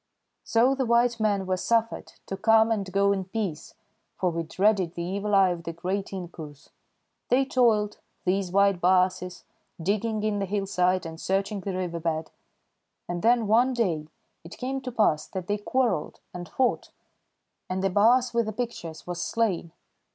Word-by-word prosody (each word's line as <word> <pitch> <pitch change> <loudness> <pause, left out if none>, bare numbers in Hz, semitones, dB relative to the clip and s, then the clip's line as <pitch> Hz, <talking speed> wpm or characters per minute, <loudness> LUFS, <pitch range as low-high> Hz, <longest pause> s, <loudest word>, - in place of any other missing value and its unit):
"So 240 +4 +3
the 265 -2 -1
white 235 0 +3
men 205 -3 +1
were 185 0 0
suffered 230 +3 0
to 195 - -4
come 220 +2 +4
and 200 -4 -1
go 200 +1 +3
in 195 -1 -1
peace, 190 -6 -4 0.4
for 180 -2 +1
we 170 0 -2
dreaded 185 +1 +1
the 170 - -3
Evil 200 +3 -1
Eye 195 -1 +5
of 175 -1 -4
the 165 - -5
great 190 +4 -3
inkoos. 165 -6 -9 0.6
They 265 +2 +3
toiled, 220 -6 +2 0.3
these 185 0 0
white 200 -1 +3
baases, 180 0 +1 0.4
digging 210 +5 -1
in 210 -1 0
the 195 - -2
hillside 185 -2 0
and 160 0 -8
searching 195 +2 -1
the 190 -1 -4
riverbed; 165 -3 -3 0.8
and 175 0 -3
then 235 +1 +3
one 240 +5 +3
day 170 -10 0 0.4
it 165 - -11
came 265 +1 -3
to 255 -1 -5
pass 185 -10 +2
that 190 -2 -5
they 205 +2 -1
quarrelled 210 -8 -1
and 175 -1 -7
fought, 255 -2 0 0.8
and 185 +1 -2
the 195 - +1
baas 240 +5 +4
with 235 -1 +1
the 215 - -3
pictures 210 -8 -5
was 175 -1 -4
slain. 190 -6 -1
195 Hz, 165 wpm, -26 LUFS, 180-225 Hz, 0.8 s, Eye